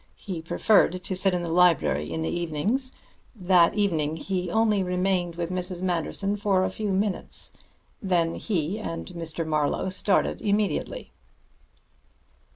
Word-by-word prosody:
He 180 -5 -6
preferred 185 +2 +2
to 190 - -2
sit 190 +1 +3
in 175 - -2
the 170 - -3
library 165 - +3
in 80 -1 -2
the 80 - -1
evenings. 180 - -1 0.4
That 180 -4 +4
evening 160 -7 +1
he 180 +2 -3
only 215 0 +2
remained 180 -1 0
with 170 0 -3
Mrs. 180 0 -3
Manderson 185 +3 -1
for 195 -2 +2
a - - -1
few 210 -2 -3
minutes. 195 +1 0 0.5
Then 175 -4 +1
he 190 -1 -2
and 165 -6 -5
Mr. 165 -2 -5
Marlowe 155 +3 0
started 190 +1 0
immediately." 210 - -1
180 Hz, 140 wpm, -26 LUFS, 165-200 Hz, 0.5 s, That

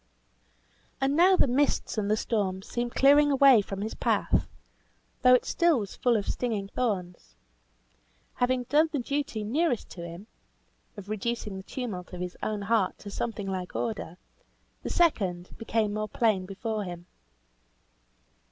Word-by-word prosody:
And 270 +1 +1
now 365 +4 +6
the - - +4
mists 275 +3 +1
and 210 -2 -1
the 215 - +2
storms 195 -4 -2
seemed 240 0 -3
clearing 290 +2 +6
away 270 -4 +7
from 195 0 -6
his 215 +2 -3
path, - - +1 0.7
though 255 -1 +7
it 250 - +1
still 340 -4 +3
was 205 -4 -5
full 245 -2 +2
of 205 - -3
stinging 215 -5 -2
thorns. 180 - -3 1.0
Having 250 0 +1
done 305 +6 +3
the 295 - -1
duty 270 -4 -2
nearest 250 +2 0
to 175 - -8
him 170 +3 -8 0.7
(of 200 -1 -9
reducing 215 0 -3
the 190 - -6
tumult 195 -5 -6
of 180 - -6
his 180 0 -5
own 210 -1 -2
heart 205 -2 +1
to 205 - -9
something 215 -1 -3
like 185 -2 -4
order), 205 -7 -3 0.6
the - - -5
second 190 - +1
became 225 -2 0
more 215 0 -3
plain 210 -5 +1
before 215 +2 -3
him. 175 -2 -7
215 Hz, 150 wpm, -28 LUFS, 195-250 Hz, 1.0 s, away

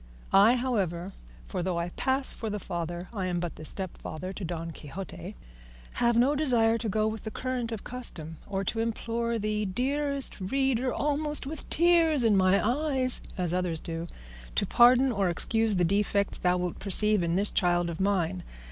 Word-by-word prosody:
I, 210 +5 +7
however 195 -8 -1 0.3
for 180 - -4
though 180 -1 -1
I 170 +1 -2
pass 265 +8 0
for 225 - -5
the 210 - -2
father, 175 -2 -4
I 190 -4 -2
am 175 -1 -1
but 175 -1 -4
the - - -10
stepfather 185 0 -6
to 195 - -7
"Don 165 -1 -4
Quixote" 185 +5 -8 0.6
have 235 -1 +2
no 255 +5 +4
desire 235 -6 +2
to 225 - -2
go 215 +2 +1
with 220 0 -3
the - - -4
current 250 0 -3
of 220 -3 -5
custom, 165 -11 -6
or 195 -1 -2
to 225 - -2
implore 230 +1 -1
thee, 215 0 -1
dearest 275 +7 -1
reader, 260 +4 +1
almost 295 0 0
with 300 +2 -7
tears 330 -4 +4
in 220 -3 +4
my 190 +2 +3
eyes, 260 -1 +1 0.2
as 175 -2 -1
others 180 -3 0
do, 165 +1 -5 0.5
to - - +2
pardon 250 +2 +5
or 200 -5 +1
excuse 225 +5 +1
the 180 -1 +3
defects 200 +2 +1
thou 180 0 +2
wilt 180 -1 -3
perceive 210 +1 +2
in 170 0 0
this 200 +2 +2
child 175 -1 +2
of 170 -1 -5
mine. 190 -2 0
210 Hz, 180 wpm, -28 LUFS, 180-245 Hz, 0.6 s, I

